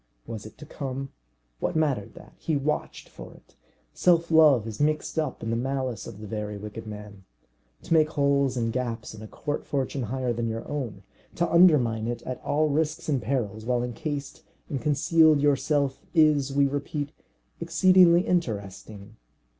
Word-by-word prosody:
Was 110 -2 -7
it - - -16
to 150 - -10
come? 135 -2 -5 0.5
What - - -2
mattered 145 -10 0
that? - - -14
He 155 -3 -1
watched 150 +2 -3
for - - -12
it. - - -22 0.4
Self 170 -1 +2
love 150 -8 +6
is 110 +3 -6
mixed 155 +2 0
up 155 - -3
in 115 - -2
the - - 0
malice 130 -1 -3
of 105 - -10
the 105 - -8
very 105 0 -4
wicked 105 +2 -8
man. 105 -2 -9 0.6
To - - -1
make 155 -1 +4
holes 140 -3 +1
and 115 -1 -1
gaps 120 -4 -3
in 110 - -11
a 110 - -8
court 145 +6 -4
fortune 135 -1 -2
higher 125 +1 -2
than 115 0 -2
your 115 +1 -5
own, 120 -9 -5 0.3
to 170 - +1
undermine 135 -11 +4
it 120 0 -4
at 130 - -6
all 155 +1 +1
risks 155 +2 -1
and 140 -4 +1
perils, 110 -6 -2
while 120 +1 0
encased 140 +5 -5 0.3
and 135 -4 -3
concealed 155 +2 +4
yourself, 140 -1 +1 0.2
is, 150 -4 +4
we 140 +1 +3
repeat, 145 +1 -3 0.5
exceedingly 175 +1 +5
interesting. 110 - -3
135 Hz, 170 wpm, -26 LUFS, 115-155 Hz, 0.6 s, love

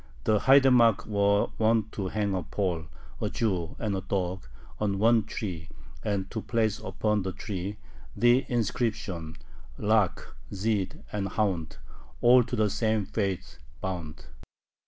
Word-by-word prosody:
The 110 -1 +3
haidamacks 130 -5 +5
were 100 -1 +2
wont 110 -1 +2
to 100 -3 -3
hang 100 0 -1
a 95 - 0
Pole, 90 -6 -2 0.3
a - - 0
Jew, 90 -7 -1
and 105 -3 -2
a 95 - -2
dog, 95 -1 -2 0.3
on 100 -2 0
one 115 +1 +4
tree, 90 -7 -5 0.3
and 100 -3 -1
to 110 - -3
place 110 -1 0
upon 105 +3 -1
the 95 0 -3
tree 100 0 -5 0.4
the 120 +2 +4
inscription: 105 -8 -2 0.4
"Lakh, 105 -2 +1 0.2
Zhyd, 100 -1 -1
and 100 -2 -2
hound 95 -6 -1 0.4
all 125 +1 +7
to 125 - -3
the 105 -3 +2
same 110 -1 +1
faith 100 -4 -3 0.2
bound." 85 -5 -5
105 Hz, 135 wpm, -28 LUFS, 95-110 Hz, 0.4 s, all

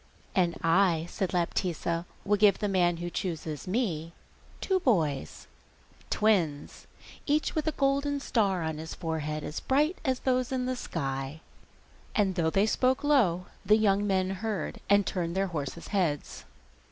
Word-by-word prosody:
'And 175 -3 +1
I,' 165 -1 +3
said 190 - -1
Laptitza, 170 -1 -1 0.2
'will 205 - +3
give 205 -1 +5
the 210 - -1
man 175 -3 +2
who 175 +1 -5
chooses 160 -5 -4
me 175 -7 -1 0.5
two 380 -1 +1
boys, 155 - 0 0.6
twins, 175 -9 0 0.4
each 300 +1 +1
with 310 0 -1
a - - +3
golden 280 0 +1
star 200 -9 +1
on 160 -1 -3
his 160 0 -6
forehead, 155 -2 -3
as 150 - -4
bright 300 +7 +1
as 260 -4 0
those 255 -1 +1
in 255 -1 -1
the 255 0 -1
sky.' 135 - -4 0.8
And 200 -3 +2
though 170 -3 +1
they 195 +5 +3
spoke 255 +5 +1
low 210 - +3 0.2
the 210 +2 +5
young 205 -1 +2
men 190 -1 +1
heard, 195 -3 -3
and 200 0 +5
turned 170 -2 -2
their 195 - +2
horses' 150 +2 -4
heads. 175 -8 -1
190 Hz, 155 wpm, -29 LUFS, 165-230 Hz, 0.8 s, give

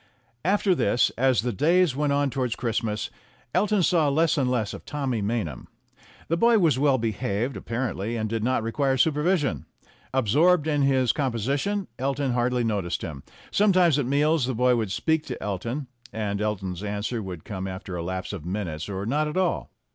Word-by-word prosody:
After 195 +1 +3
this, 120 - +2
as 130 -3 +2
the 120 -1 -1
days 170 - +3
went 145 0 0
on 140 -1 +1
towards 125 -3 -1
Christmas, 110 -3 -2 0.4
Elton 205 +1 +2
saw 160 -4 +3
less 160 +4 +2
and 135 -4 +1
less 115 -5 -1
of - - -8
Tommy 135 -6 -2
Maynham. 100 - -3 0.6
The 165 - 0
boy 230 +3 +5
was 165 -9 +3
well 140 -2 +4
behaved, 115 +1 -2
apparently, 115 -2 -3
and 110 -1 -1
did 110 0 -2
not 125 -1 +1
require 135 +4 0
supervision. 150 - +1 0.4
Absorbed 145 - +3
in 150 -2 +1
his 130 -3 +3
composition, 140 - -1
Elton 135 0 0
hardly 125 0 +1
noticed 100 -6 -1
him; 70 -4 -6 0.3
sometimes 185 -7 +4
at 130 - -1
meals 145 0 +2
the 130 - -1
boy 125 +1 +3
would 110 -5 -1
speak 160 +7 +1
to - - -5
Elton, 115 +8 -3 0.3
and 105 -1 -2
Elton's 95 -4 -2
answer 105 +3 -2
would 90 -5 -7
come 95 -2 -4
after 95 -1 -6
a 85 - -3
lapse 95 +3 -4
of 95 -6 -6
minutes, 85 -3 -4
or 95 0 -3
not 150 +6 +1
at 150 - -4
all. 185 -2 0
125 Hz, 175 wpm, -25 LUFS, 105-150 Hz, 0.6 s, boy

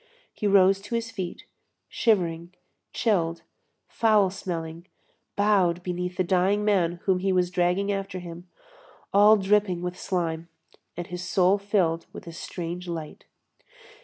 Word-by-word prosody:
He 210 - -2
rose 195 0 +5
to 235 +4 -5
his 230 0 -2
feet, 190 -6 -6 0.4
shivering, 175 -5 0 0.4
chilled, 170 -7 0 0.4
foul 210 -4 +3
smelling, 170 -2 -6 0.5
bowed 190 -4 +2
beneath 180 0 -4
the 185 - +2
dying 190 +3 +1
man 185 -5 +2
whom 190 -2 +2
he 190 +1 0
was 180 -1 +1
dragging 180 +3 +1
after 195 -1 -3
him, 175 0 -9 0.7
all 210 +2 +7
dripping 195 -3 +1
with 180 0 -4
slime, 170 -3 -2 0.5
and 175 - -4
his 180 0 -6
soul 185 +2 +3
filled 185 -5 0
with - - -9
a 170 - -9
strange 175 +1 -6
light. 165 -3 -6
180 Hz, 135 wpm, -26 LUFS, 175-200 Hz, 0.7 s, all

